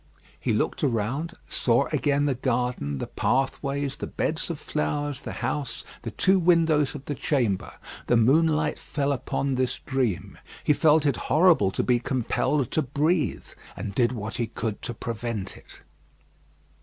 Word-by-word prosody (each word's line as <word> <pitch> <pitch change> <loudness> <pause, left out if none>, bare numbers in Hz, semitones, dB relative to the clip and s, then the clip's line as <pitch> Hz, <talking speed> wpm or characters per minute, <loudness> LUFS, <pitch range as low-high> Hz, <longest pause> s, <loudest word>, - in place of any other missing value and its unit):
He - - -1
looked - - 0
around; 135 +6 -1
saw 120 +3 +2
again 145 0 +2
the 140 - +2
garden, 125 - -1
the - - -3
pathways, 140 +1 -1
the - - -4
beds 165 +2 -2
of 165 - -3
flowers, 145 -2 -2
the - - -6
house, 135 0 -2 0.2
the - - -4
two 190 0 +3
windows 165 -5 +3
of 140 -1 -8
the 145 - -2
chamber. 120 - 0 0.3
The 120 - +4
moonlight 150 +5 +3
fell 140 -1 -1
upon 140 0 -1
this 130 -1 0
dream. 130 -9 -2 0.2
He 150 - +4
felt 155 0 +4
it 140 -4 +2
horrible 160 - +5
to - - -1
be 125 -1 +3
compelled 130 +2 0
to 155 - +2
breathe, 150 +4 0 0.3
and 100 - -4
did 120 +2 +2
what 110 -2 -5
he 120 - -1
could 110 -1 -4
to 120 - -5
prevent 115 -3 -4
it. - - -15
135 Hz, 155 wpm, -26 LUFS, 120-150 Hz, 0.3 s, horrible